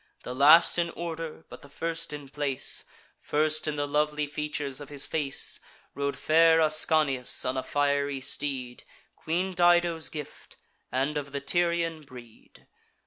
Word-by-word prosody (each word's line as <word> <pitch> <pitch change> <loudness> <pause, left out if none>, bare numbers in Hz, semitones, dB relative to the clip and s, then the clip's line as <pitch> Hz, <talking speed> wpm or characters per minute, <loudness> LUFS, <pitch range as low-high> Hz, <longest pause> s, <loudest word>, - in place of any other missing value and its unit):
The 125 - -6
last 155 +7 +6
in 170 0 0
order, 165 -2 -7
but - - -12
the 145 - -15
first 165 +2 -3
in 145 -2 -7
place, 140 -1 0 0.3
First 155 +1 0
in 150 - -1
the 145 0 -2
lovely 150 +1 0
features 145 -1 -4
of 145 - -10
his 145 -1 0
face, 145 -3 0 0.3
Rode 140 +1 -3
fair 165 +1 +4
Ascanius 155 -4 +2
on 125 - -1
a 130 - -1
fiery 140 0 0
steed, 130 -2 -3 0.3
Queen 180 +4 -2
Dido's 175 -2 +2
gift, 150 -2 -9 0.3
and 135 +4 -1
of 140 -1 -6
the 140 - -2
Tyrian 170 +2 0
breed. 125 -5 -16
150 Hz, 145 wpm, -27 LUFS, 140-160 Hz, 0.3 s, last